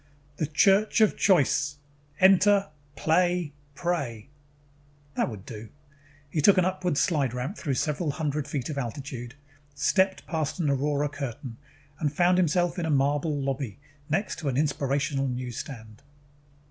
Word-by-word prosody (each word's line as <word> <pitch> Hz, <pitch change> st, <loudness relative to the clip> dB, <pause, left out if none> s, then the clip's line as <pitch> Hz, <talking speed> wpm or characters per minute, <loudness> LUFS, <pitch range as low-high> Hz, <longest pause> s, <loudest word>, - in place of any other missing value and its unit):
THE 155 Hz, -, -1 dB
CHURCH 195 Hz, +9 st, +3 dB
OF 215 Hz, -, +4 dB
CHOICE 145 Hz, -5 st, +2 dB, 0.4 s
Enter, 195 Hz, +1 st, +5 dB, 0.3 s
Play, 175 Hz, +1 st, +1 dB, 0.2 s
Pray 140 Hz, -10 st, -3 dB, 0.8 s
That -, -, 0 dB
would 105 Hz, -4 st, -9 dB
do. 110 Hz, -1 st, -9 dB, 0.6 s
He 150 Hz, +1 st, -1 dB
took 195 Hz, +6 st, +6 dB
an 185 Hz, -, +4 dB
upward 185 Hz, -3 st, -1 dB
slideramp 135 Hz, -, 0 dB
through 140 Hz, -10 st, -2 dB
several 150 Hz, +3 st, -1 dB
hundred 150 Hz, 0 st, -2 dB
feet 140 Hz, -4 st, -3 dB
of 140 Hz, -, -3 dB
altitude, 125 Hz, -1 st, -6 dB, 0.4 s
stepped 190 Hz, +7 st, +1 dB
past 155 Hz, -1 st, -2 dB
an 150 Hz, -4 st, +1 dB
aurora 145 Hz, +1 st, 0 dB
curtain, 135 Hz, -4 st, -6 dB, 0.4 s
and 150 Hz, -3 st, 0 dB
found 180 Hz, +4 st, +3 dB
himself 175 Hz, +1 st, +1 dB
in 165 Hz, -, -1 dB
a -, -, -2 dB
marble 145 Hz, +1 st, +1 dB
lobby 135 Hz, -4 st, -3 dB, 0.3 s
next 195 Hz, +7 st, -1 dB
to 150 Hz, -4 st, -2 dB
an 130 Hz, -, -1 dB
inspirational 140 Hz, -1 st, 0 dB
newsstand. 125 Hz, -2 st, -6 dB
145 Hz, 135 wpm, -27 LUFS, 135-175 Hz, 0.8 s, took